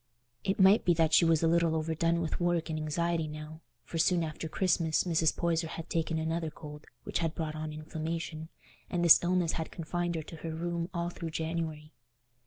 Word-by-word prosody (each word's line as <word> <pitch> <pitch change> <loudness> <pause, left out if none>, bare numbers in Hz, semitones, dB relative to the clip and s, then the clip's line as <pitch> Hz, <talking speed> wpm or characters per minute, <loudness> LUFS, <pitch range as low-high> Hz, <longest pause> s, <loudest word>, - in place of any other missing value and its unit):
It 195 +1 -1
might 195 +3 +6
be 175 - +3
that 160 -1 +2
she 170 - +6
was 165 -1 +3
a - - +4
little 165 -1 +3
overdone 165 +1 0
with 160 - -2
work 175 -2 0
and 155 - -2
anxiety 165 +1 -1
now, 155 +1 -8 0.2
for 165 - -5
soon 170 +1 +3
after 160 0 -4
Christmas 165 -3 +1
Mrs. 165 -3 +1
Poyser 165 -1 0
had 165 +1 -7
taken 165 -1 0
another 160 +1 -1
cold, 150 -1 -11 0.2
which - - -2
had 165 -1 -1
brought 160 -2 -3
on 155 0 -4
inflammation, 160 +1 -5 0.4
and 175 -1 0
this 170 - +9
illness 175 -1 +2
had 160 - -4
confined 175 +1 -3
her 160 - -3
to 165 - -10
her 160 0 -5
room 170 +1 -3
all 170 -1 -2
through 165 -1 -6
January. 160 -1 -3
165 Hz, 195 wpm, -30 LUFS, 155-170 Hz, 0.4 s, this